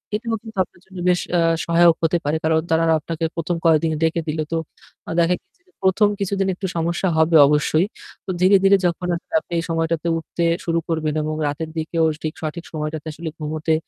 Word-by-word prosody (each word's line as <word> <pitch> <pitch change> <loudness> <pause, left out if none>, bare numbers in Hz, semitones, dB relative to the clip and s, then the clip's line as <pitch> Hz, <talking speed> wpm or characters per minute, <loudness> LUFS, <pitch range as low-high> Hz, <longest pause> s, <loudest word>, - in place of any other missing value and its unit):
এটাও 225 +1 -2
কিন্তু 220 -3 -11
আপনার 175 - -20
জন্য 190 0 -13
বেশ 180 - +3 0.2
আ - - +3 0.3
সহায়ক 170 0 +5
হতে 165 +2 +3
পারে। 150 +2 +1
কারণ 160 0 +3
তারা 160 0 +3 0.2
আপনাকে 165 +1 -5
১ম 170 +1 -1
কয়েকদিন 160 0 +4
ডেকে 165 +1 +1
দিলো। 155 0 -1
তো 165 - 0 0.6
দেখা 170 +1 +3
গিয়েছে - - -42
যে - - -29
১ম 190 +3 +4
কিছুদিন 195 0 0
একটু 190 0 -4
সমস্যা 170 +3 0
হবে 160 +1 +3
অবশ্যই। 150 +4 +2 0.4
তো - - -10
ধীরে, 190 +2 +6
ধীরে 195 0 +6
যখন 175 +1 -1 0.3
আপনি 160 - -26
এই - - -2
সময়টাতে 165 0 -1
উঠতে 165 +1 -4 0.2
শুরু 170 0 +1
করবেন 155 -2 -1
এবং 155 0 -2
রাতের 155 +2 -3
দিকেও 160 +1 0 0.2
ঠিক 155 - -2
সঠিক 160 +2 -4
সময়টাতে 155 0 -4
আসলে 160 +2 -6
ঘুমোতে 155 +1 -1
165 Hz, 190 wpm, -21 LUFS, 160-175 Hz, 0.6 s, ধীরে